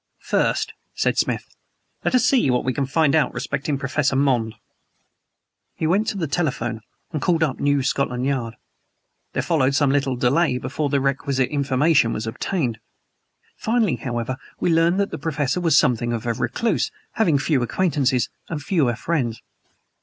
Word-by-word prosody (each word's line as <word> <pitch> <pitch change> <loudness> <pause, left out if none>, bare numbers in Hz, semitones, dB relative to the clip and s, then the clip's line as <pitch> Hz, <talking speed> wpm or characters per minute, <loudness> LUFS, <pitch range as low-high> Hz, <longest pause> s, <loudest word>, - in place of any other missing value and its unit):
"First," - - 0 0.2
said - - +1
Smith, - - 0 0.6
"let - - +1
us 250 - +4
see 250 - +3
what 125 -1 +1
we 130 - +1
can 140 -1 -1
find 150 +1 +2
out 155 -2 +2
respecting 140 +1 -2
Professor 135 0 0
Monde." 125 -5 +1 1.2
He - - -2
went 195 +7 +2
to 215 - -2
the 170 - -1
telephone 130 -8 -2 0.3
and 155 -4 -3
called 165 +1 +2
up 140 -5 -1
New 145 -1 +2
Scotland 130 -2 0
Yard. 125 -5 -1 0.8
There - - -1
followed 140 -5 +2
some 145 -2 +3
little 135 -2 +1
delay 125 +3 +2
before 135 +4 -2
the 140 0 +2
requisite 135 -1 0
information 140 -2 +2
was 110 - -3
obtained. 120 - -2 0.8
Finally, 225 -5 +1
however, 120 0 -3 0.2
we 170 - +2
learned 165 +3 +3
that 200 - 0
the - - -5
Professor 150 +1 -1
was 165 -5 +4
something 120 -1 +2
of 115 0 -4
a 120 - +1
recluse, 125 - 0 0.2
having 170 -10 +2
few 140 -1 +1
acquaintances, 130 -3 +1 0.2
and 160 - -3
fewer 145 - +1
friends. 125 -6 -2
140 Hz, 160 wpm, -22 LUFS, 125-160 Hz, 1.2 s, us